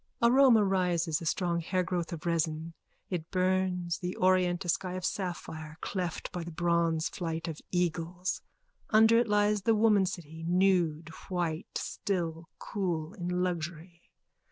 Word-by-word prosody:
Aroma 240 -2 +6
rises, 175 -4 +1
a 165 - -4
strong 170 0 0
hairgrowth 180 0 -1
of 165 -2 -6
resin. 165 -1 -1 0.4
It 170 -3 -3
burns, 185 -2 0
the 180 0 -3
orient, 185 0 +2
a - - -3
sky 180 +1 0
of 185 0 -4
sapphire, 160 -5 -4
cleft 180 -4 -3
by 175 - -4
the 170 - -7
bronze 170 -1 +1
flight 165 -1 -4
of 160 -2 -5
eagles. 175 +1 -1 0.5
Under 220 +1 +6
it 240 - +1
lies 210 0 +2
the 225 +3 +3
womancity, 185 -7 +1
nude, 175 -4 +2 0.2
white, 175 -2 -2
still, 165 -4 -3
cool, 170 -6 -3
in 180 0 -2
luxury. 170 0 -4
175 Hz, 135 wpm, -30 LUFS, 165-185 Hz, 0.5 s, Aroma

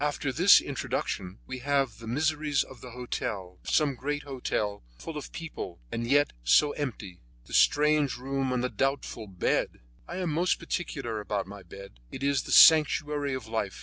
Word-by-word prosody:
After 145 -2 -1
this 180 +7 +7
introduction, 95 -8 -4
we 130 0 -6
have 135 -3 0
the 115 - -10
miseries 150 +3 +1
of 130 - -14
the 125 - -9
hotel; 105 -6 -5
of - - -6
some 150 -2 +2
great 145 +4 -3
hotel 115 -7 -3 0.2
full 165 - -8
of 150 - -7
people, 155 - -7
and 115 0 -3
yet 145 +3 +3
so 145 - +4
empty; 110 -12 -5 0.3
the - - -13
strange 150 -1 +3
room 135 +1 -2
and 125 -1 0
the 125 - 0
doubtful 135 -5 -2
bed! 95 -2 -1 0.3
I - - -6
am 180 -4 -1
most 175 +4 +1
particular 130 -10 -4
about 105 -1 -2
my 100 +1 -10
bed; 95 -6 -12
it 135 - -7
is 140 0 +2
the - - -8
sanctuary 150 -3 +5
of 130 -4 -6
life. 110 -3 -3
135 Hz, 180 wpm, -28 LUFS, 110-145 Hz, 0.3 s, this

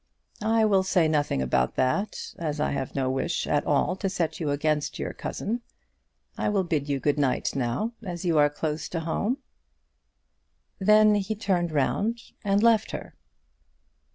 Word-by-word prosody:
"I 220 +1 +3
will 195 -3 +4
say 185 -3 +2
nothing 145 - +1
about 65 0 +1
that, 130 +12 -1
as 155 -3 -2
I 150 - +1
have 135 -2 -3
no 135 -2 0
wish 135 +6 -1
at 145 0 0
all 145 +4 +2
to 195 0 -1
set 175 -4 -2
you 155 -4 -1
against 150 +1 0
your - - -4
cousin. 235 +4 -3 0.8
I - - +1
will 200 -2 +1
bid 150 -5 -1
you 140 -1 0
good 145 +2 +1
night 135 -3 0
now 130 - -1
as 180 -4 -5
you 165 -3 +3
are 145 0 +5
close 150 +1 -3
at 165 - -1
home." 210 +10 -1 1.4
Then 210 +2 +6
he 205 +1 0
turned 185 -5 0
round 205 - 0 0.2
and 200 0 +2
left 225 -2 +4
her. - - -6
165 Hz, 165 wpm, -26 LUFS, 145-205 Hz, 1.4 s, Then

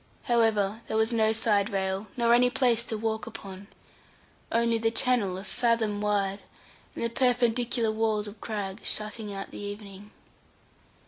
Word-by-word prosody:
However, 225 -3 +2
there 220 - -1
was 220 +2 +2
no 220 -1 +3
side 215 -2 +2
rail, 195 0 -2
nor 235 -1 +4
any 245 +1 +5
place 245 -2 +2
to 225 - -3
walk 220 +1 -2
upon, 195 -3 -9 0.8
only 230 0 +2
the 225 0 +2
channel 225 -5 +2
a 190 - -7
fathom 220 -2 0
wide, 200 -1 0 0.6
and - - -4
the 230 - 0
perpendicular 240 -2 +2
walls 215 -1 0
of 205 0 -11
crag 205 -2 -4
shutting 210 0 -3
out 195 0 -6
the - - -8
evening. 205 0 -8
220 Hz, 150 wpm, -28 LUFS, 205-230 Hz, 0.8 s, any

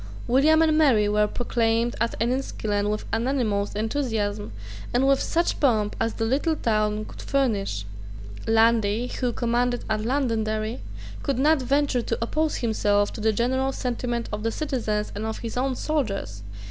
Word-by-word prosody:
William 310 +6 +4
and 315 -1 +3
Mary 260 -10 +4
were 210 0 +2
proclaimed 230 0 0
at 230 - -1
Enniskillen 220 -4 -1
with 210 0 -2
unanimous 225 -4 0
enthusiasm, 215 - -2 0.4
and 265 +2 +3
with 275 0 +3
such 340 +1 0
pomp 220 -7 +2
as 225 0 0
the 225 - -1
little 290 +7 +1
town 215 -4 0
could - - -10
furnish, 205 - 0 0.6
Lundy, 225 +1 +3
who 250 -2 +1
commanded 240 +1 0
at 215 0 0
Londonderry, 225 -3 -1 0.4
could 275 -3 -1
not 295 +2 +3
venture 275 0 +1
to 230 - -2
oppose 305 +7 0
himself 205 -3 +1
to - - -7
the 220 +1 +3
general 260 +4 0
sentiment 240 -2 -2
of 210 - -3
the 225 +1 -1
citizens 220 -7 -2
and 205 - -4
of 220 0 -3
his 230 -1 -6
own 260 +1 0
soldiers. 210 - -2
230 Hz, 155 wpm, -25 LUFS, 215-265 Hz, 0.6 s, William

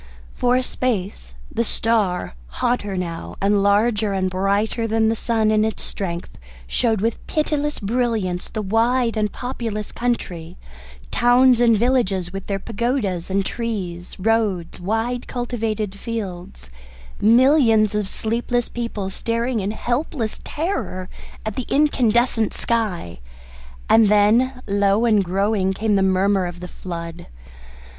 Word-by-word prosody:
For 245 0 +2
a 255 - +2
space 195 - -3 0.2
the 230 - 0
star, 210 - +1
hotter 200 - -1
now 170 -2 -5
and 200 +1 +2
larger 205 +1 +2
and 185 -1 0
brighter 200 +5 0
than 220 0 +2
the 225 - +1
sun 220 -1 +1
in 215 0 +3
its 220 -1 -2
strength, 175 -3 -5 0.3
showed 220 - 0
with 225 +1 -1
pitiless 295 -1 -1
brilliance 215 -5 -1
the 215 - -4
wide 230 +4 +2
and 210 -1 0
populous 230 -4 -4
country; 180 -8 -3 0.5
towns 245 0 +5
and 230 -2 +5
villages 200 -7 +1
with 195 0 -6
their 200 - -1
pagodas 205 -4 -2
and 195 0 0
trees, 190 -8 -4
roads, 205 -5 0
wide 225 +6 -2
cultivated 225 -5 -2
fields, 185 - -6 0.5
millions 230 -2 +5
of 210 -2 -1
sleepless 235 +3 -1
people 230 -5 -4
staring 230 +3 -1
in 195 0 -2
helpless 240 +1 -2
terror 295 - -3 0.4
at 215 -2 -3
the 255 - -4
incandescent 240 -6 +2
sky; 195 - -1 0.7
and 225 -1 +6
then, 230 +5 +3
low 200 +2 +2
and 215 -4 +4
growing, 195 +1 +1
came 210 +1 0
the 195 - +3
murmur 190 0 +2
of 175 0 -8
the 180 - -7
flood. 170 -2 -7
215 Hz, 130 wpm, -21 LUFS, 190-235 Hz, 0.7 s, and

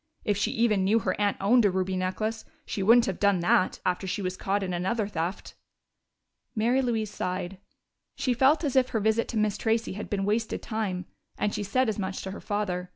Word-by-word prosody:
If 205 - +2
she 205 - 0
even 220 -4 +2
knew 205 +4 +3
her - - 0
aunt 205 -1 +1
owned 235 +5 +4
a 205 - +5
ruby 190 0 -1
necklace, 215 +5 -2 0.2
she 200 - -3
wouldn't 230 +4 +6
have 190 - -3
done 200 -2 +3
that, 175 +1 +2
after 180 +1 0
she 200 +2 -2
was 185 0 -2
caught 195 +2 -1
in 185 -1 -3
another 190 +5 -1
theft." 175 -1 -4 1.0
Mary 235 +4 +2
Louise 225 -4 -1
sighed: 185 +1 -3 0.6
she 255 - 0
felt 270 +7 +3
as 280 -4 -1
if 255 -1 +4
her 225 - 0
visit 220 +2 +1
to 230 - -4
Miss 210 -1 +1
Tracey 225 -1 0
had 210 - -6
been 195 -1 -1
wasted 220 +2 -1
time, 200 -5 -3 0.3
and 210 - 0
she - - -2
said 245 +6 +1
as 215 -1 -2
much 190 -1 -3
to 190 - -5
her 195 - -8
father. 185 -4 -2
205 Hz, 215 wpm, -27 LUFS, 190-225 Hz, 1.0 s, wouldn't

